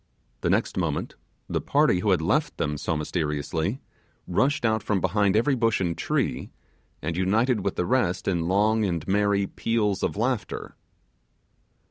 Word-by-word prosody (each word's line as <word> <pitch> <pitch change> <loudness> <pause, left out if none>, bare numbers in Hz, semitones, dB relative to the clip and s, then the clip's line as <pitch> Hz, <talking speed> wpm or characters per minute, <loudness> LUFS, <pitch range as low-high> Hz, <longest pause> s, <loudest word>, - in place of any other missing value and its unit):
The - - -1
next - - +1
moment, - - -1 0.3
the - - -1
party 90 - +3
who 105 - 0
had 90 -4 +2
left - - +1
them 75 0 -1
so 80 0 -1
mysteriously 80 - -2 0.5
rushed 130 - +1
out 110 -1 +2
from 105 -2 0
behind 100 +2 +2
every 120 +6 +3
bush 115 -3 +1
and 85 -3 -1
tree, - - -1 0.5
and 80 +2 -2
united 105 +5 +1
with 100 - -1
the 90 - 0
rest 110 -6 0
in 85 -3 0
long 105 +4 +2
and 85 -6 -2
merry 100 0 +2
peals 105 -1 -1
of - - -1
laughter. 115 0 -2
100 Hz, 155 wpm, -25 LUFS, 85-110 Hz, 0.5 s, party